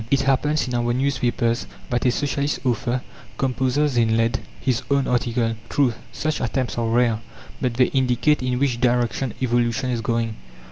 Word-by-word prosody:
It 140 Hz, -1 st, +3 dB
happens 135 Hz, +2 st, +1 dB
in 125 Hz, -, -4 dB
our 120 Hz, 0 st, +1 dB
newspapers 125 Hz, -3 st, 0 dB, 0.2 s
that 120 Hz, +1 st, +1 dB
a -, -, +4 dB
Socialist 140 Hz, +1 st, -1 dB
author 125 Hz, +1 st, 0 dB, 0.3 s
composes 130 Hz, +1 st, +1 dB
in 110 Hz, -1 st, +3 dB
lead 115 Hz, 0 st, +1 dB, 0.2 s
his 130 Hz, -3 st, 0 dB
own 140 Hz, -1 st, +2 dB
article. 120 Hz, -2 st, 0 dB
True, 135 Hz, -5 st, +2 dB, 0.2 s
such 155 Hz, -1 st, -2 dB
attempts 130 Hz, +1 st, -1 dB
are 115 Hz, -, 0 dB
rare, 115 Hz, -1 st, +2 dB, 0.4 s
but 125 Hz, -3 st, 0 dB
they 125 Hz, +1 st, +5 dB
indicate 130 Hz, +2 st, +2 dB
in 125 Hz, -1 st, 0 dB
which 125 Hz, -3 st, 0 dB
direction 125 Hz, 0 st, +1 dB
evolution 120 Hz, +1 st, +1 dB
is 120 Hz, -2 st, -1 dB
going. 115 Hz, -1 st, -1 dB
125 Hz, 160 wpm, -23 LUFS, 120-135 Hz, 0.4 s, they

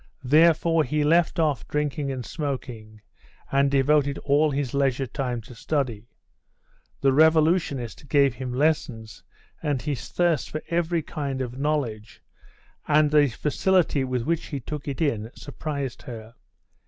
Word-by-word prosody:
Therefore 165 Hz, +3 st, +4 dB
he 150 Hz, +2 st, 0 dB
left 165 Hz, +3 st, +3 dB
off 155 Hz, -5 st, 0 dB
drinking 150 Hz, -1 st, -2 dB
and 130 Hz, -3 st, -5 dB
smoking, 120 Hz, -8 st, -5 dB, 0.5 s
and 140 Hz, 0 st, +3 dB
devoted 140 Hz, +1 st, +2 dB
all 150 Hz, +2 st, +3 dB
his 140 Hz, -3 st, -2 dB
leisure 135 Hz, -1 st, +1 dB
time 125 Hz, -2 st, -3 dB
to 120 Hz, -, -13 dB
study. 120 Hz, -3 st, -2 dB, 0.9 s
The 135 Hz, -1 st, +3 dB
revolutionist 155 Hz, -4 st, +2 dB
gave 140 Hz, -2 st, +4 dB
him 125 Hz, +1 st, -5 dB
lessons, 125 Hz, -5 st, -1 dB, 0.4 s
and 145 Hz, -4 st, 0 dB
his 145 Hz, -1 st, -4 dB
thirst 170 Hz, -5 st, +1 dB
for 155 Hz, -, -5 dB
every 170 Hz, -1 st, 0 dB
kind 140 Hz, -4 st, -4 dB
of 130 Hz, 0 st, -5 dB
knowledge, 135 Hz, -8 st, -2 dB, 0.6 s
and 150 Hz, 0 st, +4 dB
the 150 Hz, -1 st, +5 dB
facility 150 Hz, +4 st, +1 dB
with 130 Hz, -2 st, -2 dB
which 165 Hz, +3 st, -1 dB
he 140 Hz, -, -4 dB
took 150 Hz, +3 st, -7 dB
it 140 Hz, +3 st, -4 dB
in, 115 Hz, -8 st, 0 dB
surprised 140 Hz, -3 st, -5 dB
her. 115 Hz, -2 st, -9 dB
140 Hz, 140 wpm, -25 LUFS, 125-155 Hz, 0.9 s, the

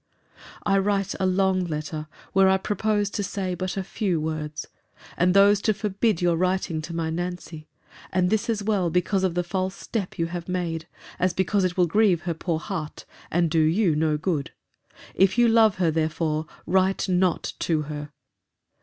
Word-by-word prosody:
I 195 Hz, -1 st, +3 dB
write 195 Hz, -1 st, 0 dB
a 190 Hz, -, +2 dB
long 185 Hz, 0 st, +2 dB
letter, 155 Hz, -2 st, -4 dB, 0.3 s
where 195 Hz, 0 st, +5 dB
I 190 Hz, -, +4 dB
proposed 210 Hz, +1 st, -1 dB
to 205 Hz, -, -1 dB
say 190 Hz, -1 st, -3 dB
but 185 Hz, +2 st, -4 dB
a 190 Hz, -, -1 dB
few 185 Hz, -3 st, -1 dB
words; 155 Hz, -1 st, -4 dB, 0.5 s
and 180 Hz, +1 st, +2 dB
those 200 Hz, 0 st, +6 dB
to 215 Hz, 0 st, +1 dB
forbid 205 Hz, -1 st, 0 dB
your 175 Hz, -1 st, +3 dB
writing 180 Hz, -2 st, 0 dB
to 170 Hz, +2 st, -7 dB
my 165 Hz, -1 st, -1 dB
Nancy: 175 Hz, -2 st, -5 dB, 0.4 s
and 180 Hz, 0 st, +1 dB
this 220 Hz, +1 st, 0 dB
as 215 Hz, -3 st, 0 dB
well 200 Hz, -4 st, +1 dB
because 180 Hz, +3 st, +1 dB
of 180 Hz, -3 st, 0 dB
the 175 Hz, -, +1 dB
false 185 Hz, +2 st, -2 dB
step 205 Hz, -6 st, -4 dB
you 165 Hz, -, +1 dB
have 170 Hz, +1 st, -6 dB
made, 170 Hz, -3 st, -2 dB, 0.3 s
as 180 Hz, 0 st, +2 dB
because 190 Hz, +1 st, +1 dB
it 180 Hz, 0 st, -1 dB
will 180 Hz, -, +5 dB
grieve 185 Hz, -1 st, +3 dB
her 175 Hz, -, -2 dB
poor 165 Hz, 0 st, -2 dB
heart, 160 Hz, -3 st, -6 dB, 0.2 s
and 170 Hz, -1 st, +1 dB
do 165 Hz, -, +3 dB
you 165 Hz, +2 st, +3 dB
no 155 Hz, 0 st, +1 dB
good. 155 Hz, -3 st, -1 dB, 0.6 s
If 195 Hz, +3 st, +3 dB
you 240 Hz, 0 st, +5 dB
love 225 Hz, -3 st, +5 dB
her, 175 Hz, -3 st, +1 dB
therefore, 155 Hz, 0 st, -1 dB, 0.2 s
write 190 Hz, +3 st, +2 dB
not 180 Hz, -1 st, +1 dB
to 155 Hz, -3 st, 0 dB
her. 150 Hz, 0 st, -6 dB
180 Hz, 180 wpm, -25 LUFS, 165-195 Hz, 0.6 s, those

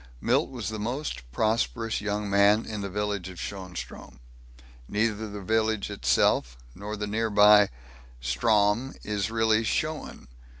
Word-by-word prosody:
Milt -, -, +1 dB
was 120 Hz, -6 st, -5 dB
the 110 Hz, -1 st, -5 dB
most 115 Hz, -, -4 dB
prosperous 115 Hz, -, 0 dB
young 105 Hz, 0 st, -2 dB
man 100 Hz, +2 st, +4 dB
in 105 Hz, -2 st, -5 dB
the 100 Hz, -, -4 dB
village 100 Hz, -2 st, -3 dB
of 90 Hz, -, -11 dB
Schoenstrom. 90 Hz, -9 st, -7 dB, 0.7 s
Neither 110 Hz, 0 st, -1 dB
the 100 Hz, -1 st, -7 dB
village 110 Hz, 0 st, 0 dB
itself -, -, +1 dB, 0.2 s
nor 105 Hz, +5 st, -6 dB
the 105 Hz, -, -3 dB
nearby 105 Hz, -1 st, +5 dB, 0.5 s
Strom 105 Hz, -, +1 dB
is 105 Hz, -1 st, -2 dB
really 110 Hz, 0 st, +2 dB
schoen. 155 Hz, -, -3 dB
105 Hz, 130 wpm, -27 LUFS, 100-110 Hz, 0.7 s, nearby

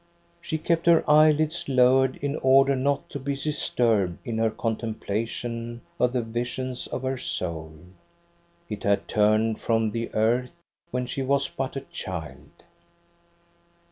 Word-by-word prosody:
She 165 Hz, -2 st, -3 dB
kept 165 Hz, +2 st, 0 dB
her 170 Hz, -1 st, +5 dB
eyelids 155 Hz, +2 st, +4 dB
lowered 130 Hz, 0 st, +4 dB
in 145 Hz, 0 st, -1 dB
order 135 Hz, +1 st, +4 dB
not 140 Hz, +2 st, 0 dB
to 140 Hz, -, -5 dB
be 140 Hz, +1 st, -2 dB
disturbed 115 Hz, -, 0 dB
in 115 Hz, -1 st, -2 dB
her 115 Hz, 0 st, +3 dB
contemplation 115 Hz, +1 st, -3 dB, 0.2 s
of 125 Hz, 0 st, +3 dB
the 125 Hz, -2 st, 0 dB
visions 120 Hz, +2 st, -4 dB
of 130 Hz, -, -5 dB
her 130 Hz, -1 st, -2 dB
soul. 80 Hz, -9 st, -3 dB, 0.9 s
It 105 Hz, -9 st, -6 dB
had 100 Hz, 0 st, +1 dB
turned 110 Hz, +1 st, +2 dB
from 115 Hz, -1 st, +1 dB
the 115 Hz, +1 st, -3 dB
earth 120 Hz, +6 st, +1 dB, 0.3 s
when 125 Hz, 0 st, -2 dB
she 125 Hz, +2 st, -4 dB
was 140 Hz, +1 st, +2 dB
but 135 Hz, 0 st, -4 dB
a 135 Hz, -, -3 dB
child. 85 Hz, -10 st, -7 dB
125 Hz, 140 wpm, -25 LUFS, 110-140 Hz, 0.9 s, her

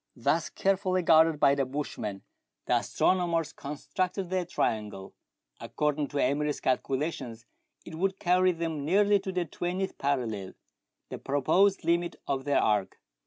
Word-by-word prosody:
Thus -, -, 0 dB
carefully 190 Hz, -1 st, 0 dB
guarded 160 Hz, -1 st, +5 dB
by 140 Hz, -, +5 dB
the 140 Hz, -1 st, +1 dB
bushman, 130 Hz, -7 st, -5 dB, 0.4 s
the -, -, +3 dB
astronomers 170 Hz, -4 st, 0 dB
constructed 180 Hz, +6 st, -4 dB
their 185 Hz, -1 st, 0 dB
triangle. 105 Hz, -, -3 dB, 0.5 s
According 150 Hz, -1 st, -1 dB
to 145 Hz, -, -5 dB
Emery's 145 Hz, +2 st, 0 dB
calcula 135 Hz, +4 st, 0 dB
tions 115 Hz, -3 st, -9 dB, 0.4 s
it -, -, -10 dB
would 190 Hz, +4 st, -1 dB
carry 185 Hz, +1 st, +3 dB
them 165 Hz, -4 st, -3 dB
nearly 200 Hz, +6 st, +3 dB
to 190 Hz, 0 st, -5 dB
the 180 Hz, -1 st, -1 dB
twentieth 180 Hz, +4 st, -4 dB
parallel, 115 Hz, -9 st, -2 dB, 0.6 s
the -, -, -6 dB
proposed 160 Hz, +8 st, +2 dB
limit 170 Hz, +1 st, +1 dB
of 135 Hz, -1 st, -2 dB
their 145 Hz, -, +2 dB
arc. 105 Hz, -3 st, 0 dB
155 Hz, 140 wpm, -28 LUFS, 140-180 Hz, 0.6 s, guarded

